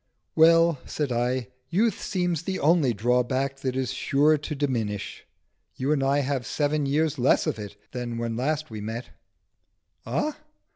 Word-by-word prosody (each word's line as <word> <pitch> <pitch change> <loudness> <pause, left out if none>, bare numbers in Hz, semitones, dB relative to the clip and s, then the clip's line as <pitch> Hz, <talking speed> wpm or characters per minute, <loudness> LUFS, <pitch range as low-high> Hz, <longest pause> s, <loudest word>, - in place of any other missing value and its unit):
"Well," 165 -1 +5
said 145 -4 -2
I, 125 +1 0 0.2
"youth 210 +4 +1
seems 180 -5 -1
the 190 +1 -3
only 155 -3 +4
drawback 125 +5 0
that 130 -2 -3
is 130 -1 -1
sure 145 +3 +3
to 150 +1 -4
diminish. 115 -8 -3 0.5
You 135 +3 -1
and 150 -3 +2
I 140 +1 +2
have 135 -2 -2
seven 145 -1 0
years 155 +1 +1
less 125 - +3
of - - -2
it 105 -2 -7 0.2
than 120 -2 -4
when 115 0 -2
we 115 - -4
last 155 0 -1
met." 110 +3 -5 0.9
"Ah?" 305 0 -2
135 Hz, 155 wpm, -26 LUFS, 125-155 Hz, 0.9 s, Well